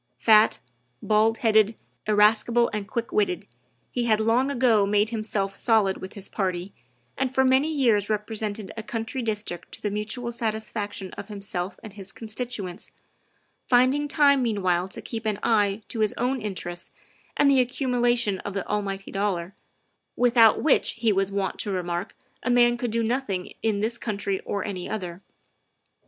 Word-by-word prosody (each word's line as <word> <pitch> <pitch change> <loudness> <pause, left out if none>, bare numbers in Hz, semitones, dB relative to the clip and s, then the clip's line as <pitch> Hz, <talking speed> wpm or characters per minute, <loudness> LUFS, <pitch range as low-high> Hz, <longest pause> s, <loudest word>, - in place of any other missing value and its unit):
Fat, 215 -1 +5 0.4
bald 220 +1 +3
headed, 220 0 +4 0.3
irascible, 215 +3 +3
and 210 -2 -3
quick 235 +1 -3
witted, 395 -4 0 0.5
he 245 -1 -1
had 220 -2 +3
long 230 +5 +2
ago 240 -6 +3
made 210 +2 +2
himself 215 -3 -1
solid 215 -5 +2
with 190 - -8
his 200 -1 -4
party, 185 -1 -3 0.4
and 265 -1 -1
for 265 - +4
many 265 +4 +3
years 230 -9 +2
represented 210 -1 -3
a 225 - -4
country 225 +4 -4
district 210 -6 -3
to - - -8
the 210 - -2
mutual 215 +4 -3
satisfaction 220 -4 -3
of 200 - -7
himself 195 -3 -4
and 215 -3 -9
his 195 -1 -8
constituents, 220 -5 -6 0.8
finding 260 +4 +3
time 280 -2 +4
meanwhile 185 -6 +1
to 190 - -8
keep 225 -2 -5
an 210 -2 0
eye 210 -2 +2
to 230 - -6
his 215 -1 +1
own 250 +1 0
interests 175 -4 -5 0.5
and 290 - +4
the 275 -2 +5
accumulation 245 -5 +1
of 200 - -6
the 195 - -3
almighty 195 -2 -3
dollar, 195 -3 -2 0.6
without 235 -3 +5
which, 305 - +3
he 225 -1 +1
was 195 0 +1
wont 195 -1 -2
to - - 0
remark, 180 0 -3 0.3
a - - -2
man 240 -1 +5
could 240 0 -3
do 230 +1 0
nothing 225 -6 -2
in 215 -3 0
this 230 +2 -1
country 200 -3 -2
or 200 - -2
any 190 -4 -5
other. 185 -4 -5
215 Hz, 160 wpm, -25 LUFS, 200-240 Hz, 0.8 s, Fat